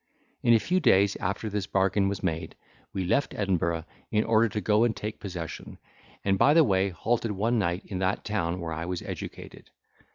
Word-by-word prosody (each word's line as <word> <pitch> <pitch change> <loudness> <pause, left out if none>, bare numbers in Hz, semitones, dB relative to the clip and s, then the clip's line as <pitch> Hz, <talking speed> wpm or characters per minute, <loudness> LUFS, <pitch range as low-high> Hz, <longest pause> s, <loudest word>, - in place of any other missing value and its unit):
In 120 -1 +5
a - - +5
few 180 +10 +1
days 100 - +4
after 100 +4 -2
this 105 -2 -2
bargain 95 +1 +2
was 100 -1 -4
made, 80 0 -2 0.4
we 95 -1 -2
left 140 +11 +1
Edinburgh, 85 -5 0 0.2
in 105 0 +2
order 115 0 +3
to 105 - -3
go 105 +1 +3
and 120 -2 +1
take 105 +1 -5
possession; 90 -5 -7 0.5
and 95 -1 +2
by 145 - +5
the 165 - +7
way 95 -5 +2
halted 110 +5 -1
one 115 +4 +1
night 90 -1 -1
in 95 -3 -5
that 95 +1 -1
town 90 -5 -1
where 85 -2 -4
I 80 +2 -4
was 90 0 -4
educated. - - -8
100 Hz, 195 wpm, -27 LUFS, 90-110 Hz, 0.5 s, the